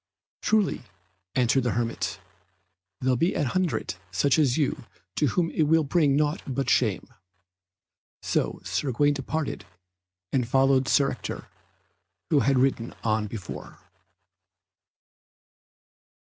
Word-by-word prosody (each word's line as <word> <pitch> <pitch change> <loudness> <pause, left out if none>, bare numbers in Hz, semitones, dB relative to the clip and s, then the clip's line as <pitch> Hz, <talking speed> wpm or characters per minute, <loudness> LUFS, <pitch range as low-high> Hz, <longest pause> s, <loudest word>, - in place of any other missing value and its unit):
"Truly," 215 -7 +1 0.5
answered 125 +1 +3
the 125 - 0
hermit, 115 -1 -2 0.8
"there 130 0 +2
be 170 +9 +1
an 150 - +1
hundred 160 - -1 0.2
such 130 - +2
as 135 -4 +3
you 145 -5 -1 0.3
to 150 - +2
whom 165 +5 0
it 155 - +1
will 160 +1 +4
bring 145 -1 +2
naught 150 +1 +1
but 135 0 -1
shame." 110 -6 +1 1.2
So - - -1 0.2
Gawaine 145 +1 +2
departed 145 +2 -3 0.7
and 125 -3 +1
followed 135 0 +3
Sir 140 -1 +3
Ector, - - -6 0.9
who 150 - +5
had 135 -1 +2
ridden 125 -3 +1
on 110 -1 +1
before. 100 -4 -8
135 Hz, 115 wpm, -26 LUFS, 120-150 Hz, 1.2 s, who